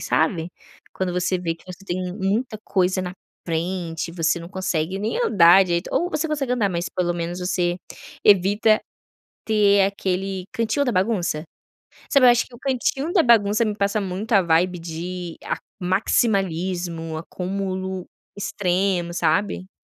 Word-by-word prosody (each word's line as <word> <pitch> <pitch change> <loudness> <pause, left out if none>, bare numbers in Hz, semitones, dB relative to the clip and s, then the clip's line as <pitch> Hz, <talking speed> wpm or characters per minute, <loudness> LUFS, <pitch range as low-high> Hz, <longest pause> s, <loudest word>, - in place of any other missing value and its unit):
sabe. 160 +1 0 0.4
Quando 185 -2 -2
você 180 +1 0
vê 170 -2 -2
que 165 - -22
você 185 +1 -10
tem 180 -1 -3
muita 215 +3 -1
coisa 185 0 +1
na 180 0 -4 0.3
frente, 170 0 -2
você 170 0 0
não 170 - -9
consegue 185 -2 -2
nem 215 - -2
andar 190 - +6
direito, 170 0 -1
ou 355 +2 +1
você 315 +2 -1
consegue 280 -4 -1
andar, 225 -5 +1
mas 175 -1 -2
pelo 175 -1 -1
menos 170 +1 -3
você 180 -1 0 0.5
evita 205 +2 +5 0.6
ter 205 -2 +4
aquele 190 -1 -2
cantinho 230 +3 0
da 250 - +1
bagunça. 185 -5 0 0.7
Sabe, 275 -3 +6
eu - - +9
acho 240 - +1
que 245 - -14
o 240 - -15
cantinho 270 +4 -1
da 360 - +5
bagunça 220 -2 +4
me 210 -1 -1
passa 200 +1 0
muito 195 +4 -5
a 195 - +6
vibe 175 +1 +2
de 170 +1 -6
a - - -1 0.2
maximalismo, 180 -4 0
acúmulo 185 +2 -4 0.3
extremo, 185 -3 0
sabe. 185 +3 0
185 Hz, 150 wpm, -23 LUFS, 175-205 Hz, 0.7 s, eu